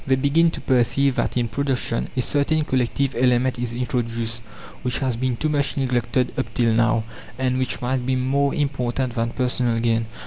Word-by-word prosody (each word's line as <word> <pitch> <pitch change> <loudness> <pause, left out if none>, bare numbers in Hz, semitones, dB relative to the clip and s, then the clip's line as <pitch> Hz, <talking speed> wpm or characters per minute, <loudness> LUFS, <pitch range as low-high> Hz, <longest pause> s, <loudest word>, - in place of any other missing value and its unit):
They 135 - +4
begin 145 +5 +3
to - - -6
perceive 130 +2 +2
that - - 0
in 120 -1 +1
production 130 -1 -1
a 125 - +2
certain 150 +3 +1
collective 130 +1 0
element 125 0 +2
is 120 -1 -3
introduced, 115 -2 -2 0.4
which 125 0 -1
has 130 -3 0
been 125 0 -1
too 155 - 0
much 145 -2 0
neglected 125 -1 0
up 130 - -2
till 115 -3 +3
now, 115 0 +2 0.3
and 130 0 0
which 130 -1 -2
might 130 +1 0
be 130 +1 0
more 140 +2 +1
important 130 -3 -1
than 115 0 -1
personal 125 -1 0
gain. 115 -1 +1
125 Hz, 180 wpm, -22 LUFS, 120-135 Hz, 0.4 s, They